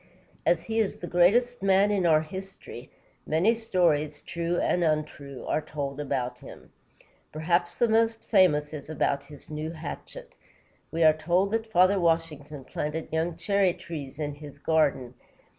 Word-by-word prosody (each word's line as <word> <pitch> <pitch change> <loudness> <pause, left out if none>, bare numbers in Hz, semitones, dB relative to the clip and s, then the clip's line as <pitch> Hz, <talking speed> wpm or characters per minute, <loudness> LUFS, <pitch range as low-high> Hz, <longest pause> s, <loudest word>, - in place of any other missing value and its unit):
As 165 -1 +3
he 225 +5 -2
is 215 -3 0
the - - -7
greatest 215 +8 +3
man 195 +1 +4
in 190 -4 +2
our 155 -2 +5
history, 185 -7 -9 0.4
many 170 +9 +3
stories, 165 -10 0
true 170 +1 -2
and 180 - +1
untrue, 150 -4 -2
are - - 0
told 145 -2 -5
about 125 -3 -2
him. - - -13 0.6
Perhaps 170 +3 0
the 240 - +2
most 225 0 +1
famous 155 -8 +3
is 150 -1 -8
about 140 -2 -1
his 145 +1 -13
new 155 +1 -4
hatchet. - - -8 0.6
We 165 +1 0
are 155 -1 +7
told 175 +5 +1
that 225 0 -2
Father 185 +1 +4
Washington 155 -4 -1
planted 155 +2 -4
young 160 +1 -1
cherry 195 +1 +2
trees 160 -7 -8
in 150 -2 -3
his 145 -1 -11
garden. 140 -5 +1
165 Hz, 155 wpm, -27 LUFS, 150-190 Hz, 0.6 s, are